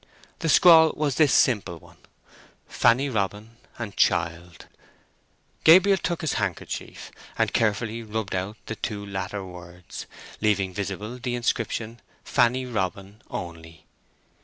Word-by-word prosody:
The 165 - -1
scrawl 160 0 +7
was 145 -3 -1
this 150 -4 +4
simple 105 -8 +2
one, - - -19 0.7
"Fanny 130 +5 +3
Robin 105 -1 -3 0.2
and 110 -4 -6
child." 85 -1 0 1.0
Gabriel 190 +4 +7
took 170 0 -2
his 160 - -1
handkerchief 95 -5 -5 0.3
and - - +1
carefully 115 +1 0
rubbed 110 -2 -4
out 95 +3 -3
the 110 - -5
two 105 -2 -5
latter 95 0 -5
words, 90 -1 -10 0.3
leaving 100 -3 +1
visible 105 +5 -5
the 120 0 -3
inscription 115 -1 -2 0.2
"Fanny 125 +1 +2
Robin" 100 -2 -4
only. 85 -2 -8
105 Hz, 120 wpm, -25 LUFS, 95-125 Hz, 1.0 s, scrawl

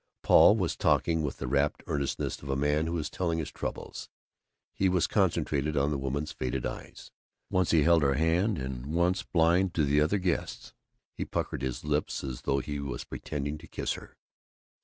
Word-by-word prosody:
Paul 105 - +7
was 90 -5 -1
talking 80 -1 +2
with 75 -3 -3
the - - -4
rapt 70 +3 +1
eagerness 70 -2 -2
of 70 - -9
a 70 - +1
man 75 +3 +1
who 85 +1 -1
is 75 -2 -2
telling 85 -1 -1
his 80 - -3
troubles. - - -6 0.6
He 95 - +2
was 90 -3 +2
concentrated 75 +1 +1
on 70 +1 +2
the 75 - 0
woman's 70 +3 -2
faded 65 0 -3
eyes. - - -7 0.4
Once 95 -3 +2
he 80 -3 +4
held 85 0 +5
her 70 -1 +2
hand 85 +7 +2
and 65 -1 -5
once, 90 +2 +2
blind 85 +2 +2
to 80 - +2
the 70 +1 +3
other 80 +7 +2
guests, 90 -3 -2 0.4
he - - -3
puckered - - -3
his 65 -2 -3
lips 75 0 -1
as 65 -3 -5
though 70 - 0
he 70 +1 -3
was 70 -4 -4
pretending 75 +1 -5
to - - -13
kiss - - -2
her. - - -11
75 Hz, 190 wpm, -29 LUFS, 70-85 Hz, 0.6 s, Paul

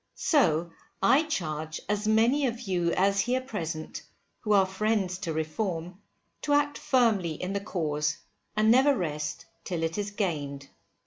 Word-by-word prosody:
So 170 - +2 0.3
I 270 +5 +6
charge 155 - -3
as 210 +1 -1
many 235 +6 +3
of 235 0 -4
you 180 -6 0
as 195 +1 +2
here 245 +5 +1
present, 170 -11 -5 0.4
who 215 - -3
are 195 -2 +6
friends 190 -1 -1
to 185 -5 -3
Reform, 165 +3 -3 0.4
to 290 - 0
act 290 0 +2
firmly 220 - +2
in 180 +5 -4
the 200 - 0
cause, 150 -6 -1 0.4
and 215 +1 +5
never 270 +3 +5
rest 150 -4 -3 0.2
till 170 -3 -3
it 165 +5 -1
is 205 0 -2
gained. 145 -9 -3
195 Hz, 150 wpm, -28 LUFS, 160-225 Hz, 0.4 s, I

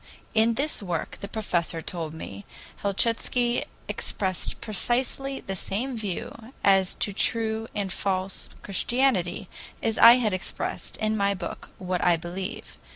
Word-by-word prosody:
In 225 +1 +4
this 290 0 0
work, 175 -5 -3
the 200 - -4
professor 175 -6 -1
told 160 -1 -4
me, 100 -10 -7 0.3
Helchitsky 235 +4 +1 0.2
expressed 185 -3 -1
precisely 255 +5 0
the 195 - -4
same 235 +8 -2
view 220 +3 -5
as 195 -2 +4
to 205 - 0
true 220 +1 +1
and 195 -3 -1
false 190 -1 -1
Christianity 200 -4 +1 0.4
as 225 -1 0
I 230 +1 +11
had 235 -5 +2
expressed 185 -1 -3
in 215 0 +1
my 200 -1 +2
book 175 -2 -6
"What 180 -1 -2
I 175 -1 +5
Believe." 180 +5 -6
200 Hz, 135 wpm, -27 LUFS, 185-230 Hz, 0.4 s, I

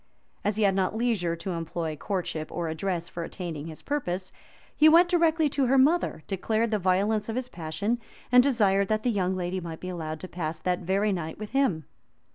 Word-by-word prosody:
As 210 - 0
he 215 - +1
had 195 -1 +4
not 190 +2 0
leisure 220 -8 0
to 170 +3 -5
employ 165 -1 -3
courtship 165 -2 -3
or 170 -1 -2
address 170 +1 -2
for 175 -2 -5
attaining 165 -3 -6
his 160 -1 -10
purpose, 190 -11 -2 0.4
he 310 +1 +7
went 345 +3 +6
directly 330 -3 +3
to 275 -2 +1
her 270 +2 +4
mother, 280 - +3
declared 220 +4 0
the 215 - +1
violence 200 +4 +1
of 225 - -2
his 255 0 -3
passion, 170 +8 -2 0.3
and 250 0 +8
desired 205 -7 +3
that 215 +1 0
the 245 - +2
young 190 -3 0
lady 185 0 -2
might 165 -2 -7
be 185 - -6
allowed 160 -3 -4
to 185 - -6
pass 160 -3 -4
that 180 +1 0
very 195 +3 +1
night 160 -3 -4
with 215 0 -7
him. 260 - +1
190 Hz, 205 wpm, -27 LUFS, 170-230 Hz, 0.4 s, and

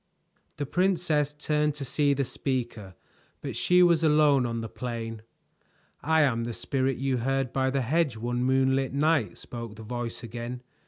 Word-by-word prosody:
The 145 - -2
princess 165 -3 +1
turned 150 0 0
to 140 -2 -5
see 140 +2 +2
the 140 0 0
speaker, 120 -7 -3 0.5
but - - -5
she 180 0 +4
was 170 -2 +4
alone 150 -4 +4
on 115 -1 -3
the 115 - -4
plain. 115 -1 -5 0.8
"I 160 +1 +3
am 115 -5 +1
the 120 0 -4
Spirit 130 +2 -1
you 135 -1 0
heard 135 +1 -1
by 130 0 +1
the 135 0 0
hedge 140 0 +1
one 120 +2 -2
moonlight 130 0 +2
night," 145 -4 +1
spoke 115 -3 -8
the 110 - -10
voice 120 +1 -5
again. 120 +2 -6
130 Hz, 165 wpm, -27 LUFS, 120-150 Hz, 0.8 s, she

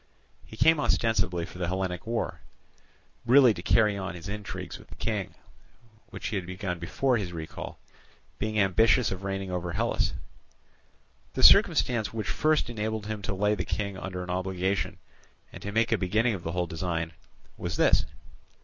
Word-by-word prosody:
He 110 - -13
came 160 +4 +5
ostensibly 115 - +1
for 90 - -11
the 90 - -1
Hellenic 95 +1 -3
war, 115 0 -2 0.8
really 125 0 +6
to - - -7
carry 105 -3 +3
on 95 -1 -4
his 85 - -8
intrigues 105 0 -6
with - - -16
the - - -12
King, - - -3 0.7
which - - -5
he 105 - -1
had 90 -2 -4
begun 90 -1 -4
before 125 +9 +1
his 95 -5 -3
recall, 80 -2 -7 0.6
being 110 +1 -2
ambitious 105 +4 +4
of 95 0 -5
reigning 95 -1 -3
over 90 -1 -3
Hellas. - - 0 1.2
The - - 0
circumstance 115 -4 +6
which 110 -3 -4
first 155 -2 +2
enabled 110 -2 -3
him 105 -1 -4
to 100 0 -3
lay 105 +2 +2
the 95 -4 -1
King 100 0 -3
under 90 -1 -5
an 90 - -5
obligation, 95 +1 -1 0.6
and - - -9
to 100 - -5
make 115 +2 +2
a 115 - +2
beginning 110 +6 +2
of 95 - -5
the 85 0 -4
whole 90 0 0
design, 85 -1 -3 0.4
was - - -4
this. - - +4
100 Hz, 170 wpm, -28 LUFS, 90-110 Hz, 1.2 s, really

